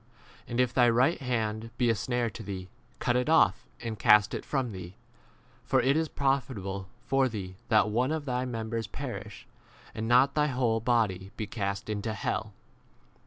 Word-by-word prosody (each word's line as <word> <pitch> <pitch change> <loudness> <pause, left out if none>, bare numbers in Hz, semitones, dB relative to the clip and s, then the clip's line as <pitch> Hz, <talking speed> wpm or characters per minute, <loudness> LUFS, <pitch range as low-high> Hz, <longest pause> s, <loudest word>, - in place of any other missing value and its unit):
w - - -12
And 120 - 0
if 125 -1 +2
thy 120 -2 +5
right 125 +8 +3
hand 115 -3 -2
be 125 - +2
a - - +3
snare 120 +2 -1
to 110 - -9
thee, 95 -3 -6 0.3
cut 120 - 0
it 125 +4 +1
off 110 -11 +4
and 115 -2 -5
cast 105 0 +5
it - - -3
from 130 -5 -1
thee: 90 -1 -8 0.7
for 130 - +2
it 130 +3 +3
is 160 0 +1
profit 135 -3 0
able 95 0 -5 0.2
for 135 -1 +2
thee 95 -5 -6
that 110 -2 +5
one 125 +6 +1
of 155 -2 -2
thy 125 -2 -1
mem 115 -3 -4
bers 115 -2 -2
perish, 105 -4 -7 0.5
and 110 +1 -3
not 125 +4 +5
thy 150 0 +2
whole 125 -4 +1
body 110 -5 +1
be 110 - -2
cast 100 -2 -3
into 105 +1 -3
hell. 110 +1 -2
115 Hz, 190 wpm, -29 LUFS, 105-125 Hz, 0.7 s, thy